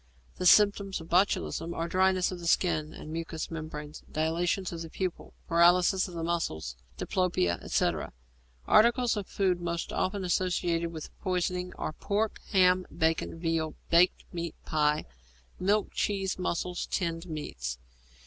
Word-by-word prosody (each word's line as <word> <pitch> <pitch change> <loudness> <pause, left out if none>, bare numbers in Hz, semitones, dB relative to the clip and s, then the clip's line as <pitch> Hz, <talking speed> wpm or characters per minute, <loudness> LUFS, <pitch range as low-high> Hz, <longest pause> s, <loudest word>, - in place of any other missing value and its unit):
The 180 - +2
symptoms 200 -1 +5
of 160 - -11
botulism 170 - +1
are 165 - -2
dryness 185 +1 +2
of 175 -2 -7
skin 155 -4 +2
and 155 - -9
mucous 165 0 -4
membranes, 155 -2 -6
dilatation 170 +4 0
of 165 -1 -6
pupils, 185 -3 -4 0.2
paralysis 175 +3 +4
of 180 - -10
muscles, 165 - -2 0.2
diplopia, 130 - 0
etc. - - 0 0.5
Articles 235 +1 +4
of 205 -2 -4
food 185 -3 0
most 170 -1 -3
often 195 0 -1
associated 175 -2 0
with 160 -2 -8
poisoning 180 0 -1
are 155 - -4
pork, 210 +5 -1
ham, 185 -1 +4
bacon, 160 +1 0
veal, 165 -2 -1 0.2
baked 175 +2 +4
meat 170 -1 -4
pie, 150 0 +1 0.5
milk, 205 +3 +1
cheese, 195 -2 -1
mussels, 180 0 -2
tinned 170 -1 -2
meats. 65 - -5
175 Hz, 130 wpm, -29 LUFS, 160-185 Hz, 0.5 s, symptoms